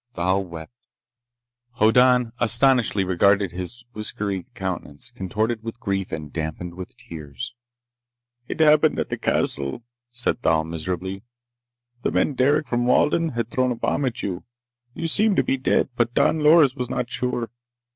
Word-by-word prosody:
Thal 95 +3 +1
wept. 85 +2 -10 1.0
Hoddan 125 +1 +4
astonishedly 120 -3 +3
regarded 100 +1 +3
his 90 +7 -7
whiskery 105 -2 -3
countenance, 95 -8 -5
contorted 110 +4 -2
with 115 +1 -7
grief 95 -3 -2
and 75 -2 -6
dampened 80 +2 -4
with 90 +1 -9
tears. 75 - -8 0.9
"It - - -3
happened 155 0 +5
at - - -2
the - - -4
castle," 70 - -1 0.3
said 120 0 -2
Thal 80 -5 +2
miserably. 90 +4 -4 0.8
"The - - 0
man 145 - +1
Derec, 145 +3 +2
from 120 0 0
Walden, 160 +4 +2
had 120 0 -3
thrown 130 -1 +1
a - - -1
bomb 130 - -1
at 125 0 -3
you. 95 -3 -3 0.5
You 165 - -4
seemed 205 +5 +2
to - - +4
be - - +1
dead. 130 - +1
But 120 -1 0
Don 160 - +3
Loris 150 -3 +6
was 125 -3 -4
not 125 -1 -2
sure. 120 -3 -2
115 Hz, 150 wpm, -23 LUFS, 90-125 Hz, 1.0 s, Loris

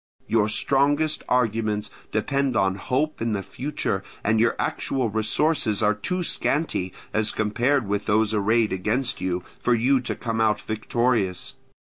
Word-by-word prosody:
Your 110 -2 +2
strongest 145 +6 +2
arguments 110 -4 0 0.2
depend 135 +4 0
upon 95 -2 +2
hope 135 +10 -1
and 115 -2 0
the 100 - -3
future, 125 -8 -3 0.2
and 110 +1 +2
your 115 +1 +3
actual 130 -5 -1
resources 110 +1 +1
are 105 0 +4
too 180 - -2
scanty, 145 - 0 0.2
as 110 -1 +1
compared 120 +4 +1
with 100 0 -2
those 110 0 +2
arrayed 110 +1 +2
against 110 +7 -1
you, 90 -1 -1 0.2
for 120 - +3
you 130 +4 +3
to 120 - -3
come 115 -2 -2
out 110 -1 +2
victorious. 110 -4 -1
110 Hz, 145 wpm, -24 LUFS, 105-130 Hz, 0.2 s, are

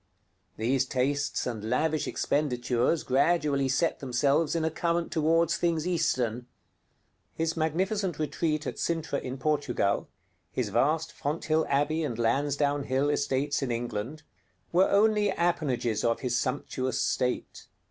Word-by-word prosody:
These 130 +4 +1
tastes 140 +3 -1
and 110 -3 -4
lavish 155 +5 +1
expenditures 125 0 0
gradually 140 0 +2
set 150 +6 +1
themselves 140 +5 +1
in 165 -1 0
a 160 - 0
current 170 +1 -1
toward 165 +1 +2
things 170 -1 0
Eastern. 125 -9 0 0.9
His 165 0 -1
magnificent 180 +3 0
retreat 155 0 -1
at - - -5
Cintra 160 -4 -1
in 130 +1 -5
Portugal, 140 -8 0 0.4
his - - -2
vast 160 +2 +1
Fonthill 155 +2 -1
Abbey 145 +3 +1
and 120 -7 -3
Lansdowne 140 +4 +1
Hill 135 +3 +1
estates 145 0 0
in 135 - -2
England, 120 +5 -4 0.5
were 180 +3 +4
only 210 0 +3
appanages 145 - 0
of 115 -1 +1
his 125 -2 -1
sumptuous 130 +1 -2
state. 125 0 -1
145 Hz, 125 wpm, -28 LUFS, 130-165 Hz, 0.9 s, were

